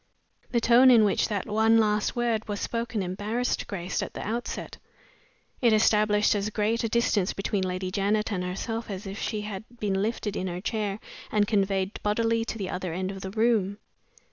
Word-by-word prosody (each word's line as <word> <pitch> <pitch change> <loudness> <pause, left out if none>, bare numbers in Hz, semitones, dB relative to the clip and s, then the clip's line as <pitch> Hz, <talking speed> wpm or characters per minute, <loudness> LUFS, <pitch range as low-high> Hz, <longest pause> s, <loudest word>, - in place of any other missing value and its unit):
The 235 - +2
tone 240 +3 +6
in 230 -4 +7
which 200 - +2
that 205 -3 -2
one 220 +1 +3
last 210 -1 +2
word 235 -3 0
was 205 -1 -3
spoken 230 -3 -2
embarrassed 210 +7 -2
Grace 180 -2 -3
at - - -6
the - - -5
outset. 235 +3 -4 0.8
It 235 -3 +5
established 210 -1 +4
as 205 0 -1
great 215 +3 0
a 230 - 0
distance 215 -5 +1
between 195 0 -1
Lady 185 0 -2
Janet 210 +3 0
and 185 -3 -1
herself 225 +6 -4
as 195 +1 -5
if 195 +2 -6
she 215 - -2
had 210 -1 -5 0.2
been 195 -2 0
lifted 210 -1 -2
in 185 - -2
her 175 0 -4
chair 210 0 -2 0.3
and 210 -1 +3
conveyed 195 -2 0
bodily 225 +2 +1
to 225 - -4
the 195 -4 -4
other 180 -1 -3
end 185 +2 -2
of 195 -1 -8
the 190 - -5
room. 215 -2 +1
210 Hz, 190 wpm, -27 LUFS, 195-225 Hz, 0.8 s, in